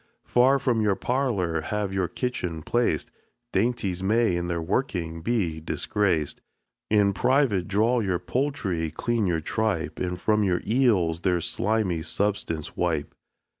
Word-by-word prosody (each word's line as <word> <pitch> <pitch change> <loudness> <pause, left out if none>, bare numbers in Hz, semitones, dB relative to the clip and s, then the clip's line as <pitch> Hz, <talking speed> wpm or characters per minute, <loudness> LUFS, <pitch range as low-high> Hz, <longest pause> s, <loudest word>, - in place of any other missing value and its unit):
Far 130 +3 +4
from 125 -5 +1
your 105 -2 +2
parlor 105 -12 0
have 105 0 -2
your 95 -2 0
kitchen 90 -11 -3
placed, 120 +7 0 0.4
Dainties 100 -4 0
may 110 0 +2
in 85 0 -2
their 85 -1 -1
working 85 -3 -2
be 90 -6 0
disgraced. 80 -1 -1 0.5
In 105 -2 +4
private 125 -6 +2
draw 110 +5 +2
your 95 -5 0
poultry, 95 - -1
clean 110 +6 -1
your 85 -2 0
tripe, 105 -1 -1
And 90 0 -2
from 105 +2 +2
your 90 -3 +1
eels 105 -9 +2
their 90 0 +1
slimy 100 -1 0
substance 80 -3 -2
wipe. 80 -5 -1
95 Hz, 135 wpm, -26 LUFS, 85-115 Hz, 0.5 s, Far